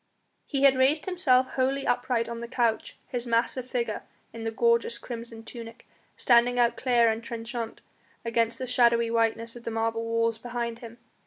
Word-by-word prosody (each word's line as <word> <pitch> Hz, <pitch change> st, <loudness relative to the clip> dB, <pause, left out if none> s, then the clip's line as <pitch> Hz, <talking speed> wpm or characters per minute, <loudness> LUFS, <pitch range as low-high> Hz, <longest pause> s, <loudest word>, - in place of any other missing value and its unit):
He 275 Hz, -2 st, -1 dB
had 275 Hz, -1 st, +7 dB
raised 280 Hz, +4 st, +3 dB
himself 265 Hz, -9 st, +2 dB
wholly 270 Hz, +1 st, 0 dB
upright 245 Hz, -1 st, 0 dB
on 235 Hz, 0 st, -5 dB
the 235 Hz, -, -6 dB
couch, 235 Hz, -2 st, -1 dB
his 245 Hz, -1 st, -4 dB
massive 240 Hz, +2 st, 0 dB
figure, 235 Hz, -4 st, -2 dB, 0.3 s
in 225 Hz, -1 st, -7 dB
the -, -, 0 dB
gorgeous 235 Hz, +1 st, +1 dB
crimson 230 Hz, -2 st, -8 dB
tunic, 230 Hz, 0 st, -10 dB, 0.3 s
standing 245 Hz, 0 st, +4 dB
out 235 Hz, -1 st, +3 dB
clear 240 Hz, -3 st, +3 dB
and 220 Hz, +1 st, -4 dB
trenchant 230 Hz, 0 st, -5 dB, 0.4 s
against 230 Hz, 0 st, 0 dB
the 260 Hz, -, -4 dB
shadowy 235 Hz, -2 st, +3 dB
whiteness 230 Hz, 0 st, 0 dB
of 240 Hz, -, -11 dB
the -, -, -3 dB
marble 225 Hz, 0 st, -1 dB
walls 230 Hz, 0 st, 0 dB
behind 235 Hz, -1 st, -4 dB
him. 235 Hz, -1 st, -10 dB
235 Hz, 170 wpm, -27 LUFS, 230-245 Hz, 0.4 s, had